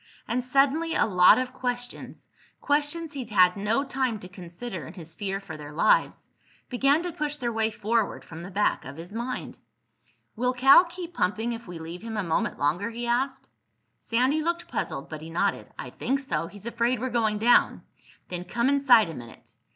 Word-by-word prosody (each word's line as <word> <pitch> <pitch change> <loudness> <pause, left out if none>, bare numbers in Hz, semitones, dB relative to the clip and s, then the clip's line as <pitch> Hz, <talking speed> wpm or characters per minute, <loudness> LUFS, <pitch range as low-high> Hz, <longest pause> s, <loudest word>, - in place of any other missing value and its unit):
And 250 +1 -1
suddenly 280 +6 +2
a - - +3
lot 180 -4 +6
of 255 0 -2
questions—questions 290 +5 -4
he'd 260 -5 -6
had 185 -3 +5
no 210 +6 0
time 260 -4 -1
to 180 - -9
consider 180 - -8
in 165 - -11
his 165 -3 -10
fear 195 +2 -3
for 175 -6 -9
their 145 -1 -9
lives—began 275 - 0
to 355 - -3
push 295 -1 -3
their 240 -4 -2
way 220 0 +1
forward 220 0 -1
from 165 0 -9
the 175 - -8
back 205 +2 0
of 135 +3 -9
his 170 +4 -9
mind. 240 +3 -5 0.8
"Will 250 +2 0
Cal 270 +7 +7
keep 350 0 -8
pumping 225 - 0
if 230 -1 -8
we 175 -1 -7
leave 165 +2 -8
him 225 -1 -5
a 210 - 0
minute 165 -2 -1
longer?" 165 +10 0
he 235 +1 -5
asked. 265 +3 -1 0.5
Sandy 255 +7 +1
looked 340 +2 -2
puzzled 135 +3 -3
but 155 -1 -8
he 160 - -8
nodded. 165 - -1
"I - - -7
think 275 +2 -1
so. 165 - -2
He's 205 +2 -13
afraid 235 +1 0
we're 260 +1 -3
going 220 -3 +1
down." 235 +3 +3 0.4
"Then 180 0 -5
come 235 +7 0
inside 275 -7 +5
a 165 - -6
minute." 115 -2 -12
230 Hz, 185 wpm, -26 LUFS, 180-265 Hz, 0.8 s, Cal